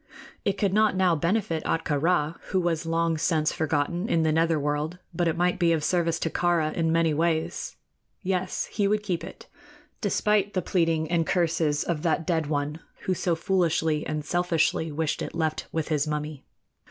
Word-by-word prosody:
It 200 0 0
could 195 -2 +1
not 215 -1 +3
now 185 -2 +3
benefit 170 0 0
Ahtka 150 -3 0
Rā, 165 -2 +2
who 190 - 0
was 170 -2 -1
long 165 -1 +1
since 155 -2 +1
forgotten 160 +6 -1
in 165 -7 +2
the 160 - +2
nether 165 0 +2
world; 150 +4 -2 0.2
but 170 +1 0
it 165 - 0
might 180 +1 +1
be 170 -2 +4
of 155 -2 -1
service 170 -1 +1
to 165 - 0
Kāra 170 -3 +1
in 165 -1 0
many 165 -1 +2
ways. 160 +1 -1 0.5
Yes; 185 -1 -1
he 205 -2 +1
would 210 +1 +1
keep 180 -5 -2
it, - - -10 0.6
despite 210 -1 +1
the 185 - +2
pleading 165 -3 +1
and 165 -2 +1
curses 165 -4 +1
of 165 -3 -2
that 165 -1 0
dead 160 -4 0
one 145 +1 -2 0.2
who 185 - 0
so 175 -1 0
foolishly 165 -4 +1
and 155 -1 -3
selfishly 165 -2 +1
wished 155 0 -1
it - - -5
left 160 -1 -1
with 160 -1 -2
his 150 -1 +1
mummy. 150 -1 -4
165 Hz, 185 wpm, -26 LUFS, 155-180 Hz, 0.6 s, be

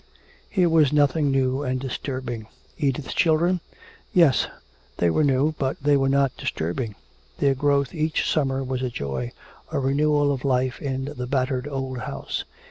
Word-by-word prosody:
Here 185 -3 +3
was 160 -4 +4
nothing 145 0 +3
new 135 0 +1
and 130 -2 -1
disturbing. 130 -3 -4 0.3
Edith's 135 -1 -1
children? 170 +2 +3 0.5
Yes, 165 -8 +5 0.5
they 85 -1 +3
were 155 - +2
new, 140 +2 +2
but 135 -1 0
they 145 +1 +3
were 135 -1 +2
not 135 -1 +2
disturbing. 100 +7 -3 0.4
Their 140 -1 +3
growth 140 0 +1
each 155 -1 0
summer 135 -3 +1
was 130 -1 -3
a 130 - -1
joy, 70 - -4 0.4
a - - -1
renewal 145 +2 +2
of 135 -2 -3
life 130 -1 0
in 135 -2 -2
the 125 0 -4
battered 130 0 0
old 135 -2 -3
house. - - -4
135 Hz, 155 wpm, -24 LUFS, 130-145 Hz, 0.5 s, Yes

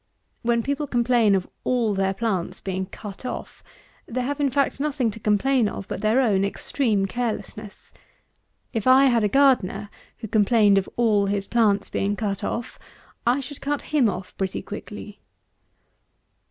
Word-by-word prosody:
When 235 0 +1
people 285 +3 -2
complain 235 -4 +3
of 185 -2 -1 0.2
all 240 -4 +1
their 195 0 0
plants 190 -5 -2
being 190 -1 -3
"cut 200 +2 -9
off," 250 - -6 0.4
they 255 +2 -2
have, 285 +4 -3
in 285 -1 +2
fact 275 0 0
nothing 275 -5 0
to 225 - -10
complain 220 +3 +2
of 195 - -7
but - - -5
their 215 +4 +3
own 205 -7 +3
extreme 205 0 0
carelessness. 215 -1 -5 0.8
If 225 0 -2
I 260 +2 +7
had 240 -4 +3
a - - +4
gardener 215 -6 +2 0.3
who 220 - -7
complained 210 -1 +4
of 190 - -6
all 215 -4 +2
his 200 0 -1
plants 210 -4 +2
being 200 +1 0
cut 200 -2 -3
off, 240 +2 -4 0.5
I 250 +4 +3
should 275 +2 -9
cut 290 +1 -3
him 265 -7 +4
off 185 -1 -6
pretty 190 -1 -2
quickly. 210 0 -8
220 Hz, 160 wpm, -24 LUFS, 200-255 Hz, 0.8 s, I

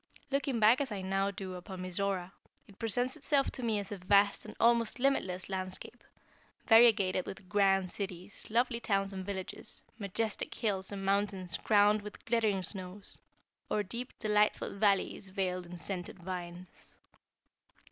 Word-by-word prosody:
Looking 275 -3 0
back 220 +5 +6
as 275 - -2
I 200 -2 -3
now 195 +1 +1
do 190 -1 -6
upon 185 +1 -7
Mizora, 185 0 -1 0.4
it 200 - -18
presents 245 +3 +1
itself 280 -2 +1
to 255 - -4
me 225 -3 +1
as 200 0 -4
a 205 - -5
vast 200 +2 +3
and - - -9
almost 230 -1 +3
limitless 190 -9 0
landscape, 185 -1 -5 0.6
variegated 220 -6 +5
with 190 -1 -8
grand 195 -1 +3
cities, 190 -1 -6
lovely 235 +1 +1
towns 195 -3 0
and 190 -1 -4
villages, 190 -1 -5 0.2
majestic 210 +2 -2
hills 200 -4 -1
and 195 -1 -5
mountains 195 -3 0
crowned 210 0 +4
with 210 0 -10
glittering 220 -5 +1
snows, 185 +1 -7 0.5
or 210 - +1
deep, 235 +6 -5
delightful 210 0 +1
valleys 200 -1 +1
veiled 185 -2 -2
in 175 +1 -8
scented 180 0 -5
vines. 180 -1 -8
200 Hz, 145 wpm, -32 LUFS, 185-215 Hz, 0.6 s, back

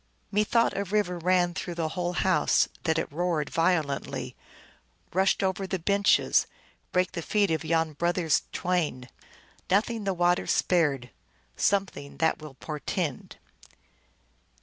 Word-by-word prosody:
" - - -42
Methought 215 +3 +2
a 200 - 0
river 195 -3 -1
ran 175 0 +2
Through 175 0 -5
the 165 -2 -1
whole 175 +1 -2
house, 185 +1 +2 0.2
that 160 -1 +2
it - - -2
roared 165 -1 -1
violently, 165 -4 -1 0.8
rushed 190 +2 +2
over 190 0 -1
the 190 - -1
benches, 200 +3 +3 0.4
brake 180 0 +1
the 175 - -4
feet 200 +2 +1
of 160 - 0
yon 160 -1 0
brothers 170 0 +1
twain; 155 -9 -1 0.6
Nothing 215 +3 +1
the 195 -1 0
water 175 0 +2
spared; 145 - +1 0.4
Something 190 -8 -1
that 160 0 +1
will 150 -3 -10
portend." 150 0 -4
175 Hz, 130 wpm, -27 LUFS, 160-190 Hz, 0.8 s, benches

